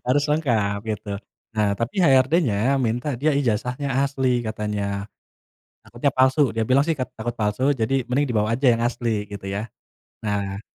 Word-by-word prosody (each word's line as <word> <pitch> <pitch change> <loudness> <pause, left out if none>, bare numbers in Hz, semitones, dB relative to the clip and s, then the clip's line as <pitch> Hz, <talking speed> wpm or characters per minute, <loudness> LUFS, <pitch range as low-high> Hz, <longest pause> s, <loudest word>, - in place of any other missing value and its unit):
harus 145 +3 +3
lengkap 115 -10 +1
gitu. 110 -2 -4 0.5
Nah, 105 -2 +2
tapi 115 - -3
HRD-nya 135 - +3
minta 120 +1 -1
dia 150 +5 +1
ijazahnya 125 +1 -1 0.2
asli 130 -3 0
katanya, 105 -2 -3 1.0
takutnya 120 +4 -1
palsu, 130 +3 +3
dia 110 0 -1
bilang 135 +2 +4
sih 165 - 0
kat 130 - -1
takut 115 +2 -3
palsu 110 +6 +1
jadi 130 0 0
mending 140 +3 +2
dibawa 110 -3 0
aja 135 - +2
yang 115 - -2
asli 120 -3 -1
gitu 100 -1 -7
ya. 100 +3 -4 0.5
Nah, 100 -2 -2
120 Hz, 155 wpm, -23 LUFS, 105-135 Hz, 1.0 s, bilang